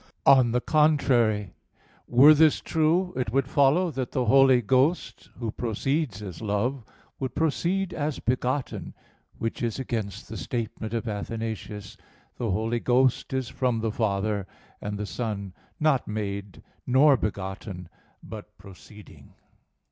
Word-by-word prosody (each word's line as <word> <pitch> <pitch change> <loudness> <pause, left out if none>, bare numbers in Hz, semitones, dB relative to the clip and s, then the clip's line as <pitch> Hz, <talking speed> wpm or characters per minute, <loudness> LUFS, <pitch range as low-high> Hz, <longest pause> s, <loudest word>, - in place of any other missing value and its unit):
On 130 -3 +6
the 125 +1 +1
contrary, 125 - +2 0.5
Were 135 +6 +7
this 155 0 +4
true, 170 +3 +1
it 125 -4 -2
would 135 +1 +1
follow 145 +6 +3
that 130 -3 -4
the 130 -3 0
Holy 135 +1 +6
Ghost 130 - 0
Who 115 -3 -3
proceeds 120 - -2
as 90 -5 -8
love, 110 +5 -1 0.4
would 130 -3 -4
proceed 175 +4 0
as 150 -1 -2
begotten; 130 +2 -2 0.4
which 115 - -4
is 115 -2 -1
against 110 -6 -4
the 110 - -7
statement 115 -1 -4
of 115 +1 -3
Athanasius: 110 -1 -5 0.4
"The 115 - -2
Holy 110 +4 0
Ghost 125 +1 +2
is 130 -3 -2
from 125 -3 -1
the 110 -1 -1
Father 100 -2 -1 0.3
and 105 0 -4
the 105 - -3
Son, 100 -4 -4 0.3
not 150 -5 +2
made, 100 -2 -5 0.2
nor 135 +3 +6
begotten, 95 -4 -5 0.4
but 105 -1 -10
proceeding." 100 +2 -15
120 Hz, 135 wpm, -26 LUFS, 105-135 Hz, 0.5 s, Were